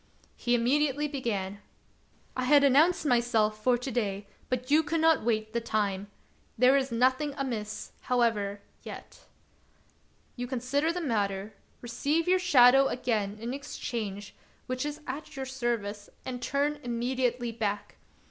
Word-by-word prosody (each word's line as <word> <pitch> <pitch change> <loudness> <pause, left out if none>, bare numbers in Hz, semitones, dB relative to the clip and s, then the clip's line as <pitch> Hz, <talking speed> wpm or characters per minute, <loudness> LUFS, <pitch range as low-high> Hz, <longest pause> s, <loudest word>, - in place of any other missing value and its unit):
He 245 0 +1
immediately 285 +4 +2
began: 205 -8 -3 0.3
— - - -37
" - - -34
I 255 - -1
had 285 +2 +6
announced 305 +5 +4
myself 225 -5 +2
for 250 0 +4
to 250 +2 -5
day, 205 -4 -2 0.2
but 255 +1 -2
you 305 +2 +6
could 320 +1 -1
not 320 -4 +4
wait 220 -1 -1
the 235 - 0
time. 205 -3 -1 0.5
There 250 +3 +6
is 270 -2 +1
nothing 260 +5 +1
amiss, 220 -6 -4
however, 215 -5 0 0.2
yet. - - -10 1.1
You 245 0 -4
consider 265 +5 0
the 355 +1 -3
matter, 205 - -1 0.3
receive 295 +7 -1
your 370 +1 +4
shadow 270 -6 +6
again 215 -6 -1
in 235 +3 -4
exchange, 225 -7 -5 0.3
which 255 +3 -2
is 295 +1 -6
at 275 +4 -6
your 265 -1 -4
service, 235 -6 -3 0.2
and 250 -1 -5
turn 290 +3 0
immediately 245 0 -1
back. 205 -3 -3
245 Hz, 145 wpm, -29 LUFS, 220-280 Hz, 1.1 s, had